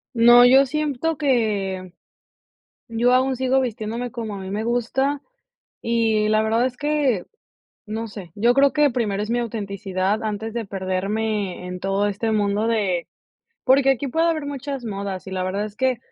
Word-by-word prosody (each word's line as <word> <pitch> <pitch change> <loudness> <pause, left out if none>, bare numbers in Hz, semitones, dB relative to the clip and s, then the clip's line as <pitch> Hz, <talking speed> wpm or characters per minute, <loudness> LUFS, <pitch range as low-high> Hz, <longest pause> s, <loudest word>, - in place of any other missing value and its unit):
No, 240 +1 +8
yo 265 +2 +6
siento 305 +2 -1
que 205 -9 0 1.0
yo 235 +2 +2
aún 260 +1 +2
sigo 260 +1 +2
vistiéndome 235 0 -3
como 225 -4 -5
a - - -6
mí 190 0 -7
me 210 +2 -2
gusta, 265 +4 0 0.6
y 225 -2 +1
la 215 0 +3
verdad 225 +2 +1
es 255 -1 -3
que, 290 -9 0 0.6
no 220 +2 -4
sé, 200 -5 -9
yo 235 +4 +3
creo 275 +2 +3
que 295 -1 +4
primero 210 -5 -1
es 215 - -4
mi 240 - +1
autenticidad, 200 -2 -2
antes 220 +1 -3
de 230 -2 -4
perderme 195 0 -2
en 180 0 -6
todo 195 +2 0
este 205 +3 -2
mundo 210 0 +1
de 200 -7 0 0.6
porque 270 +1 +4
aquí 270 +1 +1
puede 325 +6 +1
haber 310 -3 -2
muchas 275 -2 -5
modas 200 -3 -5
y 190 - -8
la 185 -1 -2
verdad 195 +3 -2
es 210 -1 -9
que, 260 +1 +1
225 Hz, 170 wpm, -22 LUFS, 200-255 Hz, 1.0 s, No